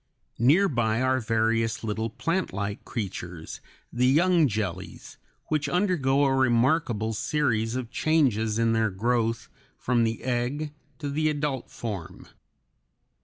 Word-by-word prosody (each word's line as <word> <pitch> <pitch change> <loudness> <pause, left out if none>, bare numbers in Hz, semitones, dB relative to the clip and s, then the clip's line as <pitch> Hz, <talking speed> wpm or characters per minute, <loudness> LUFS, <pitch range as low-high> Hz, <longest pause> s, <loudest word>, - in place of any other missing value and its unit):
Near 155 - +5
by 120 - 0
are 130 0 +2
various 115 0 0
little 110 +1 -2
plantlike 115 - -2
creatures, 90 -7 -6 0.3
the 125 +1 +2
young 165 +3 +4
jellies, 100 -5 -5 0.3
which 150 -2 0
undergo 150 -7 +2
a 135 - +2
remarkable 120 -3 +2
series 115 -3 0
of 125 -2 -4
changes 125 -9 +1
in 115 0 +2
their 110 -1 +2
growth 115 +3 0 0.3
from 120 -2 +1
the 115 0 -2
egg 130 +5 -2 0.2
to 145 - -5
the 155 +2 +1
adult 145 -4 -2
form. 100 -8 -6
120 Hz, 120 wpm, -26 LUFS, 110-145 Hz, 0.3 s, Near